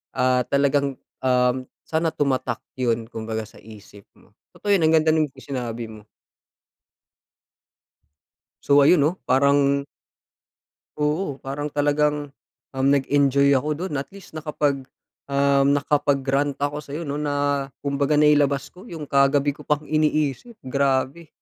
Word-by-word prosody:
Ah, 125 Hz, 0 st, +2 dB
talagang, 140 Hz, -1 st, +1 dB, 0.2 s
um, 125 Hz, 0 st, +2 dB, 0.2 s
sana 160 Hz, 0 st, 0 dB
tumatak 130 Hz, -5 st, -1 dB, 0.2 s
yun 115 Hz, -3 st, -1 dB
kumbaga 110 Hz, -1 st, -5 dB
sa -, -, -17 dB
isip 105 Hz, -2 st, -14 dB, 0.2 s
mo. -, -, -25 dB, 0.2 s
Totoo 205 Hz, -, -3 dB
'yon, 180 Hz, -, +1 dB
ang 160 Hz, +1 st, +4 dB
ganda 155 Hz, 0 st, +2 dB
nung 155 Hz, -3 st, +1 dB
isinabi 125 Hz, -4 st, -5 dB
mo. 110 Hz, -1 st, -13 dB, 2.6 s
So, 140 Hz, 0 st, +5 dB
ayun, 150 Hz, +1 st, +5 dB
oh, 155 Hz, +5 st, +1 dB
parang 140 Hz, +1 st, +3 dB, 1.1 s
Oo. 150 Hz, 0 st, -1 dB
Parang 140 Hz, +2 st, -4 dB
talagang, 145 Hz, 0 st, 0 dB, 0.4 s
um, 135 Hz, 0 st, 0 dB
nag-enjoy 140 Hz, 0 st, +3 dB
ako 135 Hz, +3 st, +1 dB, 0.2 s
dun 175 Hz, -, -5 dB
at 140 Hz, -, -6 dB
least 200 Hz, -, -13 dB
nakapag, 145 Hz, -3 st, -2 dB, 0.4 s
um, 140 Hz, 0 st, +3 dB
nakapag-rant 140 Hz, -1 st, +1 dB
ako 145 Hz, +1 st, -2 dB
sa'yo 150 Hz, +2 st, -6 dB
'no, 145 Hz, -1 st, -4 dB
na 145 Hz, -1 st, -1 dB, 0.2 s
kumbaga 140 Hz, +1 st, 0 dB
nailabas 145 Hz, -2 st, +3 dB
ko 185 Hz, +6 st, -14 dB
yung 165 Hz, -6 st, -7 dB
kagabi 140 Hz, 0 st, +2 dB
ko 145 Hz, +1 st, -14 dB
pang 150 Hz, 0 st, +1 dB
iniisip, 155 Hz, -, 0 dB
grabe 135 Hz, +4 st, 0 dB
140 Hz, 130 wpm, -23 LUFS, 135-150 Hz, 2.6 s, So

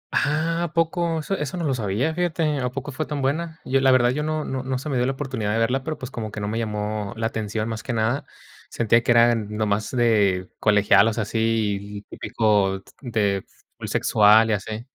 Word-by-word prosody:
¡Ah! 165 Hz, +3 st, +1 dB
¿A 155 Hz, -, -7 dB
poco? 165 Hz, 0 st, 0 dB
Eso 195 Hz, +6 st, -2 dB
eso 150 Hz, 0 st, -4 dB
no 175 Hz, -, -3 dB
lo 135 Hz, -, +1 dB
sabía, 115 Hz, +6 st, -1 dB
fíjate, 160 Hz, -4 st, 0 dB
¿a 125 Hz, -, -1 dB
poco 140 Hz, +3 st, -6 dB
fue 150 Hz, +3 st, -4 dB
tan 145 Hz, -3 st, -3 dB
buena? 160 Hz, +4 st, -2 dB
Yo, 135 Hz, +1 st, +1 dB
la 135 Hz, -, +5 dB
verdad 125 Hz, -1 st, +4 dB
yo 145 Hz, +4 st, -2 dB
no 155 Hz, 0 st, -2 dB
no 130 Hz, -1 st, -3 dB
no 130 Hz, 0 st, -2 dB
se 140 Hz, +4 st, -6 dB
me 135 Hz, -, 0 dB
dio 125 Hz, +1 st, +1 dB
la 135 Hz, -, 0 dB
oportunidad 130 Hz, -7 st, -3 dB
de -, -, 0 dB
verla, 125 Hz, +4 st, +1 dB
pero 155 Hz, +2 st, -4 dB
pues 130 Hz, -1 st, -8 dB
como 110 Hz, -3 st, -5 dB
que 105 Hz, -, -6 dB
no 105 Hz, -, -3 dB
me 110 Hz, +2 st, -2 dB
llamó 105 Hz, -1 st, -3 dB
la 115 Hz, -, -2 dB
atención, 110 Hz, -1 st, -2 dB
más 110 Hz, -1 st, -4 dB
que 125 Hz, -, -4 dB
nada. 115 Hz, +5 st, 0 dB, 0.5 s
Sentía 115 Hz, 0 st, +2 dB
que -, -, -6 dB
eran 115 Hz, -2 st, +4 dB
nomás 105 Hz, 0 st, -1 dB
de 105 Hz, -7 st, +2 dB
colegialas, 105 Hz, +1 st, +4 dB
así 105 Hz, -2 st, -1 dB
típico 100 Hz, -4 st, +1 dB, 0.2 s
de 105 Hz, -6 st, 0 dB, 0.4 s
full -, -, -6 dB
sexual, 110 Hz, +1 st, +4 dB
y -, -, +3 dB
así. 110 Hz, +3 st, -4 dB
115 Hz, 210 wpm, -23 LUFS, 105-140 Hz, 0.5 s, la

